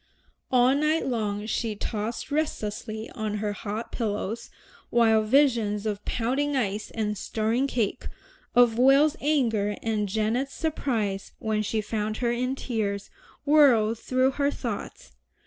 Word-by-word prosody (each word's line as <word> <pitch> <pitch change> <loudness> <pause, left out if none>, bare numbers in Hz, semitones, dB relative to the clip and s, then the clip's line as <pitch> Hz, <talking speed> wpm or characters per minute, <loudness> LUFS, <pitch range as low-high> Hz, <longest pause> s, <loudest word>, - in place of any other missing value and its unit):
All 250 0 +5
night 305 +3 +1
long 215 -5 -2
she 220 0 -2
tossed 215 +5 -4
restlessly 220 -7 -2
on 215 -1 -3
her 210 0 -2
hot 215 +2 -5
pillows, 220 -1 -3 0.4
while 225 -2 +4
visions 220 -4 +2
of 210 -1 -2
pounding 270 +5 0
ice 210 -4 -1
and 210 -2 -2
stirring 225 +6 0
cake, 230 -6 -2 0.5
of 240 -1 +5
Will's 275 +4 +5
anger, 225 -9 +1
and 215 -3 -1
Janet's 225 +6 -1
surprise 230 -11 -2
when 220 -2 -1
she 215 +1 -1
found 215 0 -3
her 240 -1 0
in 250 +2 -1
tears, 210 -6 -3 0.3
whirled 245 -7 +5
through 255 +2 +2
her 280 +1 +1
thoughts. 235 - -6
225 Hz, 130 wpm, -26 LUFS, 210-260 Hz, 0.5 s, All